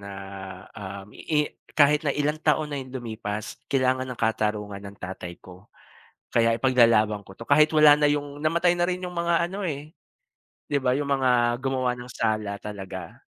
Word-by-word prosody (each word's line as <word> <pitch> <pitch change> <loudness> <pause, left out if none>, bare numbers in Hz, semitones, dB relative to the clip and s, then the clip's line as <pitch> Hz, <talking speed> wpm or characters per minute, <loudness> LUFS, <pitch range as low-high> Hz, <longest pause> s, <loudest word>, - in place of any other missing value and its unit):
na 100 0 -9 0.6
um 100 0 -8
i 150 -2 0 0.3
kahit 150 0 +5
na 150 - -2
ilang 150 +2 0
taon 150 -1 +1
na 140 - -2
yung 130 - -9
lumipas 110 -1 -5
kailangan 130 -1 +1
ng 125 - -5
katarungan 105 -2 -1
ng 100 0 -10
tatay 90 -2 -7
ko. 90 +2 -15 0.6
Kaya 115 -1 +3
ipaglalaban 115 -4 +4
ko 95 - -14
to. 115 - -9
Kahit 150 +4 +5
wala 150 -1 +9
na 150 0 +3
yung 145 0 -2
namatay 170 +3 +3
na 175 0 +1
rin 180 0 -2
yung 180 - -5
mga 170 0 +2
ano 195 +3 -6
eh, 150 +1 -6 0.8
di 145 - +1
ba 130 -2 +2
yung 140 +2 -1
mga 125 -3 +3
gumawa 130 -2 0
ng 125 0 -9
sala 105 -2 -1
talaga. 95 -3 -8
130 Hz, 175 wpm, -25 LUFS, 105-150 Hz, 0.8 s, wala